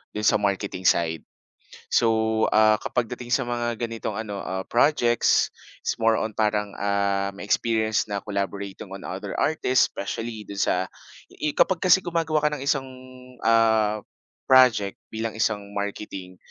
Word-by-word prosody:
do'n 105 Hz, -, -3 dB
sa 105 Hz, -, +4 dB
marketing 100 Hz, -2 st, -1 dB
side. 80 Hz, -1 st, +1 dB, 0.7 s
So, 110 Hz, -1 st, +2 dB
ah, 110 Hz, 0 st, +4 dB
ka -, -, -4 dB
pagdating 125 Hz, 0 st, -3 dB
sa 125 Hz, +2 st, +1 dB
mga 120 Hz, -1 st, -2 dB
ganitong 115 Hz, 0 st, -4 dB
ano, 105 Hz, -3 st, -4 dB
ah, 95 Hz, 0 st, -4 dB
projects, 120 Hz, -2 st, +3 dB, 0.3 s
it's -, -, -2 dB
more 115 Hz, 0 st, +4 dB
on, 110 Hz, -, -2 dB
parang, 105 Hz, -1 st, 0 dB
ah, 100 Hz, -1 st, +1 dB
may -, -, -7 dB
experience 110 Hz, +1 st, +1 dB
na 100 Hz, -1 st, -4 dB
collaborating 100 Hz, -1 st, -4 dB
on 95 Hz, 0 st, -9 dB
other 95 Hz, +2 st, -5 dB
artists, 135 Hz, -4 st, +2 dB
especially 110 Hz, +2 st, -5 dB
do'n 100 Hz, -, -7 dB
sa 95 Hz, -1 st, +1 dB, 0.4 s
ih 150 Hz, -1 st, -3 dB
kapag 190 Hz, -, +3 dB
kasi 185 Hz, +1 st, +6 dB
gumagawa 165 Hz, -3 st, 0 dB
ka 150 Hz, -, +3 dB
ng 135 Hz, -, -7 dB
isang, 135 Hz, -1 st, 0 dB, 0.6 s
ah, 110 Hz, -2 st, +3 dB, 0.5 s
project 125 Hz, -7 st, +5 dB
bilang 110 Hz, 0 st, -4 dB
isang 105 Hz, -2 st, -2 dB
marketing, 100 Hz, -2 st, -5 dB
110 Hz, 150 wpm, -24 LUFS, 100-120 Hz, 0.7 s, kasi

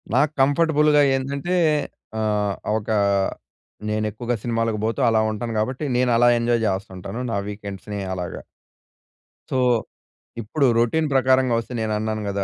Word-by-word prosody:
నాకు 145 Hz, +3 st, +3 dB
కంఫర్టబుల్‌గా 150 Hz, +1 st, +4 dB
ఏందంటే 140 Hz, +7 st, -2 dB, 0.6 s
ఆహ్, 105 Hz, -2 st, 0 dB, 0.2 s
ఒకా 110 Hz, 0 st, -1 dB, 0.9 s
నేను 110 Hz, 0 st, 0 dB
ఎక్కువగా 120 Hz, +3 st, -3 dB
సినిమాలకు 115 Hz, -2 st, -1 dB
పోతూ 115 Hz, -, -1 dB
అలా 110 Hz, -, +3 dB
ఉంటాను 115 Hz, +2 st, -4 dB
కాబట్టి, 130 Hz, +6 st, -2 dB
నేను 125 Hz, 0 st, +2 dB
అలా 120 Hz, +1 st, +5 dB
ఎంజాయ్ 115 Hz, 0 st, +1 dB
చేస్తు 95 Hz, 0 st, -2 dB
ఉంటాను. 95 Hz, +5 st, -6 dB
నా 100 Hz, -, 0 dB
వీకెండ్స్‌ని 105 Hz, 0 st, -6 dB
అలాగా. 90 Hz, -1 st, -5 dB, 1.1 s
సో, -, -, -1 dB, 0.8 s
ఇప్పుడు 135 Hz, +6 st, 0 dB
రొటీన్ 155 Hz, +7 st, +2 dB
ప్రకారంగా 130 Hz, -1 st, +3 dB
వస్తే, 115 Hz, -, -7 dB
నేను 110 Hz, -1 st, -1 dB
అన్నాను 110 Hz, 0 st, -2 dB
కదా! 100 Hz, 0 st, -1 dB
115 Hz, 135 wpm, -22 LUFS, 105-130 Hz, 1.1 s, అలా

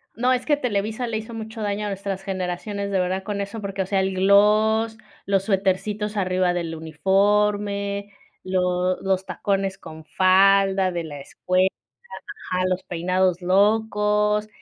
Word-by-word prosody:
No, 250 Hz, +3 st, +2 dB
es 250 Hz, -, -2 dB
que 295 Hz, -2 st, +2 dB
Televisa 220 Hz, -1 st, -2 dB
le 225 Hz, -2 st, -2 dB
hizo 220 Hz, +2 st, -7 dB
mucho 220 Hz, 0 st, -7 dB
daño 205 Hz, 0 st, -2 dB
a -, -, -2 dB
nuestras 195 Hz, -1 st, -4 dB
generaciones, 195 Hz, +2 st, -4 dB
de 195 Hz, -, +1 dB
verdad, 185 Hz, +1 st, -1 dB
con 205 Hz, 0 st, -4 dB
eso, 200 Hz, +2 st, -5 dB
porque, 195 Hz, -1 st, -3 dB
o -, -, -7 dB
sea, 195 Hz, 0 st, +1 dB
el 190 Hz, 0 st, -1 dB
gloss, 215 Hz, +3 st, +3 dB, 0.3 s
los 195 Hz, -1 st, +1 dB
suetercitos 205 Hz, +2 st, -1 dB
arriba 185 Hz, -2 st, +1 dB
del 170 Hz, -2 st, -3 dB
uniforme, 200 Hz, +4 st, 0 dB, 0.3 s
lo 180 Hz, 0 st, 0 dB
los 190 Hz, -1 st, 0 dB
tacones 195 Hz, -1 st, -2 dB
con 160 Hz, 0 st, -11 dB
falda 190 Hz, +2 st, +3 dB
de 170 Hz, -2 st, -3 dB
la 145 Hz, -2 st, -8 dB
escuela, 185 Hz, +6 st, 0 dB, 0.8 s
ajá, 185 Hz, 0 st, +1 dB
los 185 Hz, 0 st, -2 dB
peinados 180 Hz, +1 st, 0 dB
locos, 210 Hz, +2 st, +2 dB
195 Hz, 150 wpm, -23 LUFS, 185-210 Hz, 0.8 s, gloss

